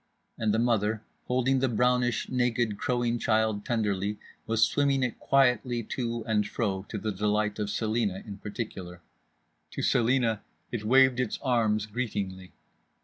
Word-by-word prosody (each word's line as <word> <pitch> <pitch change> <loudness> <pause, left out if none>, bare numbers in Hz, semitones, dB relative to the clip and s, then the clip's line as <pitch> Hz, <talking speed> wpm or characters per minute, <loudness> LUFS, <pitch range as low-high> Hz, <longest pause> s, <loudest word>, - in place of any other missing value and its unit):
And 110 -1 0
the 110 - +1
mother, 110 -2 +1 0.2
holding 130 +1 +1
the 135 0 +1
brownish, 125 0 +1
naked, 120 -4 0
crowing 120 -1 0
child 110 -2 +1
tenderly, 105 -4 -1 0.3
was 115 0 +3
swimming 140 -2 +1
it 125 - -2
quietly 125 -3 +2
to 115 0 -3
and 105 -2 +1
fro, 100 -4 -2
to 110 - -4
the 110 +1 -2
delight 105 +1 0
of 105 -1 -1
Celina 110 -2 -1
in 100 -2 -8
particular. 95 -5 -6 0.7
To - - -5
Celina 115 -2 +2 0.3
it 115 -3 -3
waved 130 +2 +5
its 125 -4 -1
arms 110 -5 +2
greetingly. 100 -5 -4
115 Hz, 145 wpm, -28 LUFS, 105-125 Hz, 0.7 s, waved